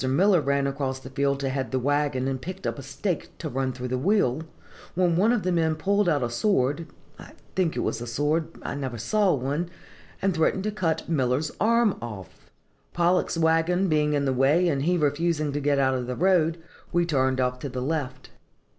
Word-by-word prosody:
Miller 180 +5 +4
ran 140 0 +1
across 135 -1 -2
the 130 0 -11
field 140 0 0
to 135 - -1
head 130 -2 -2
the 130 - -1
wagon, 140 0 0
and 135 -1 -2
picked 185 +5 -7
up - - -2
a - - -5
stake 140 +7 -4
to 160 - -5
run 135 -2 -1
through 125 0 -6
the 130 0 -1
wheel, 155 - +2 0.5
when 175 -2 +2
one 205 +7 +4
of 240 -4 +1
the 185 - 0
men 160 -2 +1
pulled 200 +4 +1
out 145 -5 +1
a 120 - -1
sword 145 - +1 0.3
(I - - -12 0.2
think 180 -4 +1
it - - -1
was 115 - -2
a 120 - -5
sword, 150 +6 0 0.2
I - - -3
never 130 -4 -4
saw 195 - +2
one), 145 +6 -2 0.5
and 195 0 +1
threatened 165 +3 +1
to 215 - -1
cut 180 -6 -1
Miller's 145 -1 0
arm 230 -1 +3
off. 105 -6 -9 0.4
Pollock's 175 0 +1
wagon 165 +3 +2
being 150 -1 +2
in 140 -1 +1
the 135 - +1
way, 145 +8 +3
and 140 -4 0
he 180 +1 +2
refusing 155 0 0
to 145 - -2
get 145 0 +1
out 135 -1 +3
of 125 -1 -2
the 125 - -3
road, 170 -2 +2 0.3
we 175 0 +2
turned 130 -5 +1
off 125 0 0
to 140 - -5
the 130 0 -4
left. 130 -2 -3
145 Hz, 210 wpm, -26 LUFS, 130-175 Hz, 0.5 s, Miller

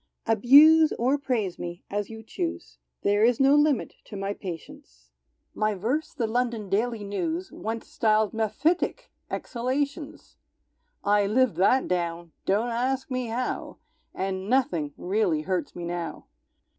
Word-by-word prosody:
Abuse 290 +8 +7
or 260 +5 +1
praise 225 -10 -2
me, 175 +1 -6
as 205 0 -2
you 220 0 -9
choose, 80 - -5 0.2
There 205 +1 +3
is 235 0 +4
no 270 +1 +5
limit 295 -4 +2
to 210 - -10
my 195 +1 -2
patience; 65 - -10 0.4
My 215 -1 0
verse 245 - -1
the 245 -5 -2
London 230 -2 -1
Daily 225 +1 0
News 185 -3 -3
Once 225 +1 -5
styled 215 -1 +1
"Mephitic 305 - 0 0.2
exhalations"! 280 +5 -3 0.7
I 205 0 +3
lived 250 +2 +2
that 225 +8 +3
down, 170 -1 -2 0.2
(don't 210 +5 +2
ask 260 +4 -1
me 255 -1 -1
how,) 245 +3 -3 0.4
And 190 +1 -3
nothing 245 - +1
really 185 -4 0
hurts 180 -3 -2
me 175 - -5
now. 170 -2 -5
220 Hz, 135 wpm, -26 LUFS, 185-255 Hz, 0.7 s, Abuse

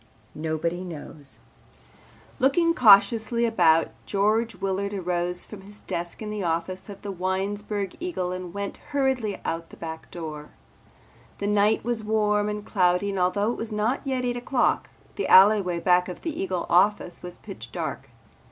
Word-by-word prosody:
NOBODY 160 +3 -2
KNOWS 145 -7 -10 1.0
Looking 335 +6 +3
cautiously 225 0 +5
about, 165 -8 +4 0.2
George 215 +2 +1
Willard 195 +2 -2
arose 180 -1 -2
from 210 -3 -10
his 205 +2 -13
desk 170 +5 -5
in 210 - -5
the 210 -1 -3
office 175 +3 -2
of 200 - -10
the 205 - -4
Winesburg 195 +2 -2
Eagle 330 - -3
and 185 -1 -5
went 200 +2 -5
hurriedly 265 -7 -1
out 165 0 -2
at - - -30
the - - -14
back 160 -1 -7
door. 155 -3 -7 0.9
The 200 - -4
night 210 +1 +2
was 235 -2 -2
warm 210 -1 +1
and 210 0 -4
cloudy 180 0 +2
and 195 - -3
although 200 +5 +1
it - - -5
was 225 0 -3
not 215 +5 0
yet 260 -2 -1
eight 245 0 -1
o'clock, 245 +1 +1 0.3
the 405 - -1
alleyway 190 -3 +6
back 180 +1 +3
of 180 - -8
the 325 -3 -3
Eagle 185 -2 -2
office 180 -1 +2
was 180 0 -9
pitch - - -10
dark. - - -5
200 Hz, 160 wpm, -25 LUFS, 180-215 Hz, 1.0 s, alleyway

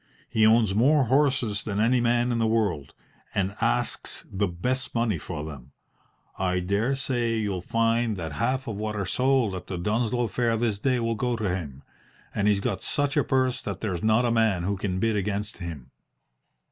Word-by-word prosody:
He 110 -2 +3
owns 110 -3 +4
more 135 +7 +4
horses 130 -5 +2
than 105 -1 -3
any 120 +3 +3
man 120 +1 +2
in 120 - 0
the 115 - +2
world, 100 -11 0 0.4
and 100 0 0
asks - - -1
the 100 +1 0
best 125 +11 -3
money 115 -7 +1
for 75 -1 -5
them. 70 -3 -10 0.7
I 90 -1 +1
dare 100 +9 0
say 120 -3 -1
you'll 100 -4 -2
find 115 +1 +1
that 80 -3 -4
half 130 - -1
of 110 -3 -4
what 110 0 -3
are 100 -2 -2
sold 125 0 +2
at 90 - -6
the 90 - -4
Dunsloe 115 +6 0
fair 115 +2 0
this 110 -3 0
day 130 +2 +1
will 115 0 0
go 120 +2 -1
to 110 -3 -2
him, 70 -6 -7 0.5
and 105 0 +1
he's 100 -1 +3
got - - -2
such 145 -1 0
a - - +3
purse 130 -2 +1
that 100 -2 -5
there's 90 -6 -2
not 110 +3 +3
a 120 - +2
man 110 -6 +2
who 100 +3 0
can 95 -1 -2
bid 110 +3 +1
against 105 +1 -2
him." 75 -8 -7
110 Hz, 195 wpm, -26 LUFS, 95-120 Hz, 0.7 s, owns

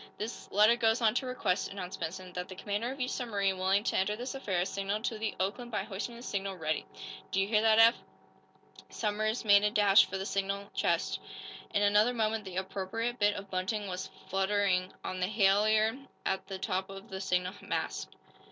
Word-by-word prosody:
"This 220 +3 -6
letter 210 +4 +5
goes 225 -1 +2
on 220 -3 +3
to 255 +2 -1
request," 210 -7 -1
announced 185 -2 -6
Benson, 180 +2 -5
"that 180 0 -5
the 185 - -7
commander 205 +5 -2
of 270 - -8
each 255 0 -1
submarine 200 -6 -1
willing 190 +2 +2
to - - -1
enter 200 +2 +1
this 245 +5 -5
affair 190 -10 -1
signal 200 +2 -2
to 225 -2 -2
the 220 -1 -2
'Oakland' 205 +6 -2
by 225 - -2
hoisting 210 +5 -5
the 235 - -10
signal 195 -4 -3
'Ready.' 155 -3 -2 0.4
Do 195 - 0
you 195 - +2
hear 210 0 +3
that, 220 0 +5
Eph?" 230 +1 +7 0.9
Somers 215 +2 -1
made 200 -1 +7
a 210 - +4
dash 205 -2 +6
for 190 - -4
the 190 - -4
signal 200 0 -2
chest. - - 0 0.5
In 205 - +2
another 210 +4 +4
moment 220 -1 0
the 185 -1 -6
appropriate 200 +6 -3
bit 205 0 +3
of 200 -1 -8
bunting 190 +3 -1
was 180 -1 -4 0.2
fluttering 190 -1 +1
on 185 - -4
the 180 - +1
halliard 215 +5 +3 0.2
at 190 - -1
the 190 -1 -5
top 190 0 -2
of 195 0 -10
the 190 0 -4
signal 180 -1 0
mast. - - -3
205 Hz, 200 wpm, -31 LUFS, 190-220 Hz, 0.9 s, Eph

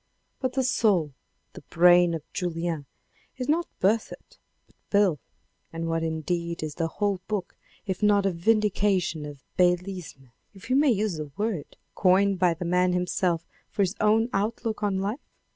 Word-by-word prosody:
But 260 -1 -2
the 265 - +1
soul, 195 - +2 0.4
the - - -10
brain 175 0 +5
of 160 - -6
Julien 165 -5 -3 0.5
is 255 - -4
not 335 +3 +1
Berthet 215 +4 -1 0.3
but - - -31
Beyle. 200 -7 +3 0.5
And 165 0 -4
what 165 0 0
indeed 170 +1 -2
is 155 -1 -4
the 165 +1 -1
whole 200 +2 -1
book 205 -4 -3 0.3
if 190 -1 -3
not 205 -1 +4
a 195 - +2
vindication 190 -4 +1
of 145 -3 -11 0.2
beylisme, 180 -7 0 0.2
if 195 +5 -13
we 255 - +3
may 290 +1 +4
use 210 -6 0
the 155 -1 -5
word, 210 -8 -3 0.2
coined 195 0 +3
by 175 -2 +3
the 175 - -5
man 180 +1 +2
himself 180 -1 0 0.2
for 200 - 0
his 185 0 0
own 220 +2 +4
outlook 220 +2 -2
on 200 -2 0
life 205 +8 -4
185 Hz, 160 wpm, -26 LUFS, 170-210 Hz, 0.5 s, brain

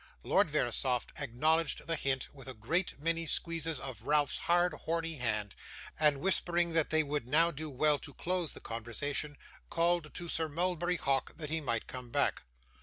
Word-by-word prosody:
Lord - - +3
Verisopht 125 -2 0
acknowledged 155 +5 +1
the 165 - +1
hint 135 -3 -1
with 135 -2 -12
a 130 - -5
great 160 - -1
many 165 +2 -1
squeezes 165 -3 -1
of 130 -5 -6
Ralph's 145 +3 +2
hard, 175 0 +4
horny 165 +1 -3
hand, 105 -5 -1 0.4
and 150 -3 +4
whispering 175 -2 +2
that 160 -2 +2
they 155 0 +3
would 145 -4 -3
now 165 +5 +4
do 155 0 -5
well 145 +2 +2
to 145 - -9
close 180 -2 -1
the - - -10
conversation, 140 +6 -2 0.3
called 170 -2 +1
to 175 - -5
Sir 160 -1 0
Mulberry 175 +2 0
Hawk 135 -3 0
that 155 -2 -5
he 160 0 0
might 115 -6 -1
come 125 -2 -8
back. - - +1
150 Hz, 175 wpm, -32 LUFS, 135-165 Hz, 0.4 s, hard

